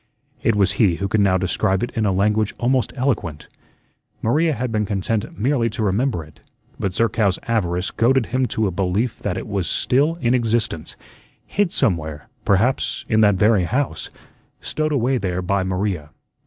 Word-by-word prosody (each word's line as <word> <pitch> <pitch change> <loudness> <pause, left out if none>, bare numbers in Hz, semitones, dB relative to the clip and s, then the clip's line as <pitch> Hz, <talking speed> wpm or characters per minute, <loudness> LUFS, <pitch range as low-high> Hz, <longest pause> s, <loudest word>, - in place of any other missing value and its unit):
It 115 - +2
was 100 -2 +3
he 95 -6 +4
who 100 +3 -2
could 105 +3 +1
now 95 -2 +3
describe 95 +1 0
it 120 - -3
in 110 -2 0
a - - +2
language 105 +2 +1
almost 130 +1 +1
eloquent. 105 - -2 0.8
Maria 155 +8 +2
had 125 +1 -3
been 105 -1 +1
content 105 +1 -2
merely 120 +1 +1
to 115 +1 -3
remember 105 -1 0
it; 75 0 -18 0.4
but 95 - -1
Zerkow's 105 -1 +1
avarice 90 -5 0
goaded 125 +1 +2
him 130 +2 0
to 110 - -1
a 95 - 0
belief 100 +6 -1
that - - -2
it - - -5
was 95 -3 -1
still 145 +6 +2
in 125 -8 0
existence, 115 -9 0 0.5
hid 200 -3 0
somewhere, 80 - 0 0.2
perhaps 110 +7 +1
in 110 -1 +3
that 105 -2 +5
very 105 -1 +3
house, 130 +9 -2 0.5
stowed 155 0 -2
away 130 -2 +1
there 90 -2 -2
by 100 +2 +1
Maria. 95 -4 -2
105 Hz, 170 wpm, -21 LUFS, 95-125 Hz, 0.8 s, that